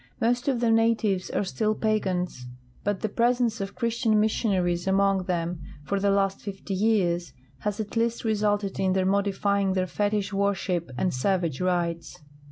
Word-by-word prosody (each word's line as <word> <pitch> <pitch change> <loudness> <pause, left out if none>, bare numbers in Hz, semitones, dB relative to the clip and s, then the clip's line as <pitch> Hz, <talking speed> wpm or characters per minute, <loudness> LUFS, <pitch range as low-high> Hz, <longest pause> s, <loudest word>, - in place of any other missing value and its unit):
Most 245 +3 +1
of 265 -4 +1
the 235 -2 +3
natives 225 -4 +2
are - - 0
still 215 +3 -1
})agans, 185 - -1 0.4
but 205 -1 -1
tlie 215 - -3
pres 240 +1 +3
ence 230 -3 0
of 195 0 -5
Christian 230 -2 +1
missionaries 190 -5 +1
among 195 -1 +2
them 170 -2 -2 0.2
for 200 +6 -1
the 200 +1 +2
last 195 -1 +1
fifty 195 0 -6
years 185 -6 +1 0.3
has 210 0 -3
at 215 +1 -5
least 230 0 0
resulted 205 -2 0
in 190 -1 +2
their 190 0 +1
modifj'ing 200 0 +1
their 185 -1 +1
fetich 205 +1 -1
worship 195 -4 0
and 180 +6 0
savage 170 +2 0
rites. 170 -2 -1
200 Hz, 165 wpm, -26 LUFS, 185-215 Hz, 0.4 s, the